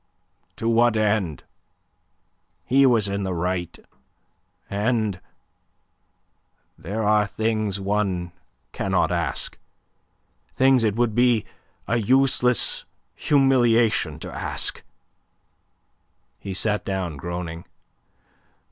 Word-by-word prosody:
"To 115 Hz, -, -4 dB
what 115 Hz, 0 st, +3 dB
end? 100 Hz, -, 0 dB, 1.2 s
He 135 Hz, +2 st, +4 dB
was 115 Hz, -5 st, +3 dB
in 100 Hz, 0 st, -2 dB
the 95 Hz, -2 st, -2 dB
right, 90 Hz, 0 st, -2 dB, 0.9 s
and... 105 Hz, -1 st, 0 dB
and -, -, -35 dB, 1.5 s
there 110 Hz, +3 st, -4 dB
are 105 Hz, 0 st, +3 dB
things 110 Hz, -3 st, -1 dB
one 95 Hz, -3 st, -1 dB, 0.4 s
cannot 95 Hz, -2 st, 0 dB
ask; 85 Hz, -7 st, -3 dB, 1.0 s
things 130 Hz, -2 st, +4 dB
it 105 Hz, -2 st, +1 dB
would 120 Hz, -1 st, +1 dB
be 120 Hz, -1 st, +3 dB, 0.4 s
a 115 Hz, -, +1 dB
useless 125 Hz, 0 st, +2 dB, 0.3 s
humiliation 120 Hz, -, +2 dB
to -, -, -7 dB
ask." -, -, -1 dB, 1.6 s
He 95 Hz, -2 st, -6 dB
sat 105 Hz, +1 st, 0 dB
down, 95 Hz, -5 st, -3 dB
groaning. 85 Hz, +2 st, -6 dB
105 Hz, 95 wpm, -23 LUFS, 95-120 Hz, 1.6 s, He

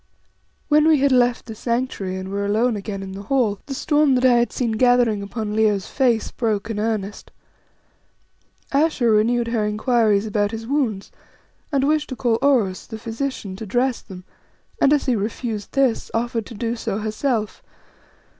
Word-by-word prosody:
When 300 Hz, +1 st, +4 dB
we 315 Hz, -1 st, +5 dB
had 280 Hz, 0 st, +2 dB
left 245 Hz, -1 st, +2 dB
the 225 Hz, -, -7 dB
Sanctuary 235 Hz, -5 st, -2 dB
and 190 Hz, 0 st, -6 dB
were 200 Hz, +1 st, -2 dB
alone 220 Hz, +4 st, +1 dB
again 200 Hz, -1 st, -5 dB
in 190 Hz, -, -7 dB
the 195 Hz, +1 st, -7 dB
hall, 220 Hz, -3 st, 0 dB
the 275 Hz, -, -4 dB
storm 295 Hz, -1 st, +2 dB
that 255 Hz, +1 st, +2 dB
I 245 Hz, -2 st, +5 dB
had 235 Hz, -2 st, +1 dB
seen 240 Hz, -3 st, -1 dB
gathering 240 Hz, -2 st, +3 dB
upon 210 Hz, +1 st, -4 dB
Leo's 210 Hz, -3 st, +2 dB
face 245 Hz, -5 st, 0 dB
broke 220 Hz, -1 st, -2 dB
in 210 Hz, -, -3 dB
earnest. 210 Hz, -2 st, -3 dB, 1.4 s
Ayesha 280 Hz, -3 st, +2 dB
renewed 230 Hz, +2 st, +2 dB
her 230 Hz, -2 st, 0 dB
inquiries 215 Hz, -1 st, +2 dB
about 205 Hz, -1 st, 0 dB
his 225 Hz, +1 st, -6 dB
wounds, 240 Hz, -7 st, -1 dB, 0.6 s
and 275 Hz, -1 st, +1 dB
wished 305 Hz, 0 st, +1 dB
to 260 Hz, -, -4 dB
call 235 Hz, -2 st, 0 dB
Oros, 240 Hz, -10 st, +1 dB
the 220 Hz, -, -7 dB
physician, 225 Hz, -3 st, -4 dB
to 220 Hz, -, -7 dB
dress 245 Hz, +4 st, 0 dB
them, 185 Hz, -2 st, -11 dB, 0.6 s
and 275 Hz, -, +5 dB
as 295 Hz, -1 st, +2 dB
he 255 Hz, -, +2 dB
refused 215 Hz, 0 st, -4 dB
this, 270 Hz, -4 st, +1 dB
offered 230 Hz, -1 st, -1 dB
to 230 Hz, -, -10 dB
do 230 Hz, +2 st, -2 dB
so 225 Hz, -3 st, -3 dB
herself. 215 Hz, +1 st, -2 dB
230 Hz, 175 wpm, -21 LUFS, 210-255 Hz, 1.4 s, we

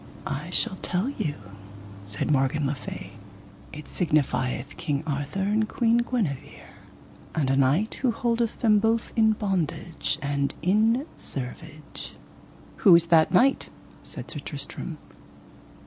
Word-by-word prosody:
I 150 Hz, +5 st, -4 dB
shall 190 Hz, +1 st, 0 dB
tell 185 Hz, +8 st, 0 dB
you, 155 Hz, -, -3 dB, 0.7 s
said 100 Hz, +8 st, -2 dB
Morgan 140 Hz, +1 st, +2 dB
le 135 Hz, -, 0 dB
Fay, 135 Hz, -, -8 dB, 0.6 s
it 150 Hz, 0 st, -9 dB
signifieth 140 Hz, -4 st, 0 dB
King 145 Hz, -3 st, -2 dB
Arthur 145 Hz, +5 st, -2 dB
and 215 Hz, +2 st, +1 dB
Queen 235 Hz, -1 st, +2 dB
Guenever, 225 Hz, -, -2 dB, 0.7 s
and 140 Hz, -4 st, +1 dB
a -, -, +3 dB
knight 140 Hz, -, +2 dB
who 260 Hz, -, +3 dB
holdeth 230 Hz, 0 st, -1 dB
them 215 Hz, -3 st, +5 dB
both 225 Hz, +2 st, 0 dB
in 220 Hz, -2 st, +4 dB
bondage 175 Hz, -7 st, -2 dB
and 140 Hz, 0 st, -1 dB
in 220 Hz, -, +3 dB
servage. 140 Hz, +3 st, -5 dB, 0.6 s
Who 190 Hz, -5 st, +7 dB
is 170 Hz, 0 st, +5 dB
that 160 Hz, -1 st, +6 dB
knight? 255 Hz, +9 st, +3 dB, 0.3 s
said -, -, -6 dB
Sir -, -, -5 dB
Tristram. -, -, -6 dB
170 Hz, 130 wpm, -26 LUFS, 140-220 Hz, 0.7 s, Who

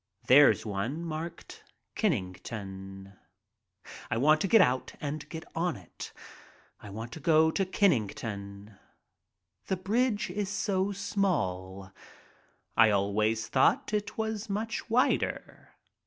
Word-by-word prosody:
There's 145 Hz, -1 st, +6 dB
one 110 Hz, +10 st, -3 dB
marked 165 Hz, +1 st, -7 dB, 0.3 s
"Kenn 115 Hz, -, 0 dB
ington." 95 Hz, -1 st, -9 dB, 0.9 s
I 115 Hz, -, 0 dB
want 155 Hz, +5 st, +4 dB
to -, -, +1 dB
get 225 Hz, +4 st, +6 dB
out 130 Hz, -7 st, +2 dB
and 150 Hz, +1 st, -5 dB
get 160 Hz, -1 st, -7 dB
on 170 Hz, +1 st, 0 dB
it 90 Hz, -4 st, -10 dB, 0.3 s
— -, -, -28 dB
I 105 Hz, -, -10 dB
want 110 Hz, +4 st, -7 dB
to 160 Hz, -, -8 dB
go 160 Hz, +1 st, +4 dB
to 195 Hz, -, 0 dB
Kenn 195 Hz, +1 st, +4 dB
ington. 100 Hz, -, -5 dB, 0.9 s
The 190 Hz, -, 0 dB
bridge 210 Hz, +1 st, 0 dB
is 200 Hz, +1 st, -2 dB
so 200 Hz, -1 st, 0 dB
small; 95 Hz, -, -2 dB, 0.8 s
I 115 Hz, -, +6 dB
always 105 Hz, +3 st, +1 dB
thought 215 Hz, -, +2 dB
it 210 Hz, -1 st, -2 dB
was 220 Hz, -1 st, -3 dB
much 215 Hz, +2 st, -3 dB
wider. 245 Hz, +3 st, 0 dB
150 Hz, 125 wpm, -29 LUFS, -, 0.9 s, There's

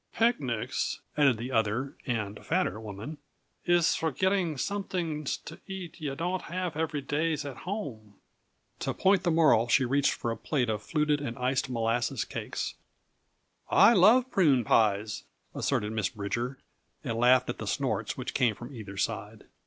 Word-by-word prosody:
"Picnics," 130 Hz, -, 0 dB, 0.2 s
added 140 Hz, -6 st, +4 dB
the 120 Hz, +4 st, -5 dB
other 115 Hz, +3 st, 0 dB
and 105 Hz, -4 st, -3 dB
fatter 100 Hz, +4 st, 0 dB
woman, 110 Hz, +8 st, -7 dB, 0.5 s
"iss 175 Hz, -1 st, +4 dB
for 160 Hz, -, 0 dB
getting 185 Hz, +2 st, +1 dB
somet'ings 170 Hz, -4 st, -2 dB
t' 165 Hz, -, -10 dB
eat 185 Hz, -3 st, -7 dB
yuh 140 Hz, -3 st, -3 dB
don'd 175 Hz, +4 st, -2 dB
haff 180 Hz, -2 st, -3 dB
every 155 Hz, -2 st, -1 dB
day 155 Hz, +4 st, 0 dB
at 145 Hz, -3 st, -5 dB
home." 110 Hz, -, -5 dB, 0.6 s
To -, -, -2 dB
point 190 Hz, 0 st, +3 dB
the -, -, 0 dB
moral 155 Hz, -9 st, +4 dB
she 130 Hz, +2 st, +4 dB
reached 140 Hz, +3 st, +2 dB
for 115 Hz, -, -3 dB
a -, -, -2 dB
plate 125 Hz, -7 st, 0 dB
of 105 Hz, -1 st, -3 dB
fluted 150 Hz, +3 st, 0 dB
and 120 Hz, -5 st, -4 dB
iced 130 Hz, +1 st, 0 dB
molasses 115 Hz, +1 st, 0 dB
cakes. -, -, -4 dB, 1.0 s
"I 200 Hz, +5 st, +7 dB
love 235 Hz, +7 st, +5 dB
prune 145 Hz, -10 st, +4 dB
pies," 105 Hz, -1 st, +2 dB, 0.3 s
asserted 105 Hz, +1 st, -1 dB
Miss 110 Hz, -3 st, 0 dB
Bridger, 120 Hz, +5 st, -3 dB, 0.5 s
and 115 Hz, 0 st, -2 dB
laughed 125 Hz, +1 st, +5 dB
at -, -, -10 dB
the -, -, -5 dB
snorts -, -, -1 dB
which -, -, -4 dB
came 115 Hz, -4 st, +2 dB
from 120 Hz, +7 st, -9 dB
either 105 Hz, -5 st, -8 dB
side. 105 Hz, +2 st, -3 dB
135 Hz, 160 wpm, -29 LUFS, 115-165 Hz, 1.0 s, I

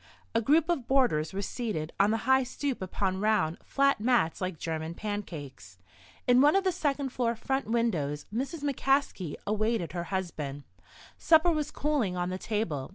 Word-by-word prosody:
A 230 Hz, -, +2 dB
group 300 Hz, +7 st, +3 dB
of 290 Hz, -9 st, -1 dB
boarders 245 Hz, -, +2 dB
were 195 Hz, +1 st, -3 dB
seated 200 Hz, -10 st, -3 dB
on 200 Hz, +1 st, +5 dB
the 225 Hz, +1 st, -1 dB
high 265 Hz, +1 st, +5 dB
stoop 260 Hz, 0 st, -3 dB
upon 190 Hz, 0 st, -1 dB
round, 210 Hz, -6 st, +1 dB
flat 275 Hz, -3 st, +2 dB
mats 230 Hz, -10 st, +2 dB
like 185 Hz, -2 st, -2 dB
German 160 Hz, +1 st, -4 dB
pancakes. 160 Hz, -, -6 dB, 0.5 s
In 250 Hz, +1 st, +5 dB
one 295 Hz, +5 st, +5 dB
of 390 Hz, -, +3 dB
the 375 Hz, -, +2 dB
second 285 Hz, -4 st, -1 dB
floor 240 Hz, -2 st, -1 dB
front 265 Hz, +4 st, -2 dB
windows 175 Hz, -12 st, 0 dB
Mrs. 275 Hz, +6 st, -3 dB
McCaskey 270 Hz, -, 0 dB
awaited 215 Hz, -5 st, 0 dB
her 170 Hz, 0 st, -4 dB
husband. 155 Hz, -7 st, -4 dB, 0.6 s
Supper 335 Hz, +1 st, +5 dB
was 305 Hz, -3 st, -1 dB
cooling 270 Hz, -12 st, -1 dB
on 180 Hz, 0 st, -1 dB
the 185 Hz, -, -4 dB
table. 175 Hz, -, -2 dB
220 Hz, 165 wpm, -29 LUFS, 175-270 Hz, 0.6 s, on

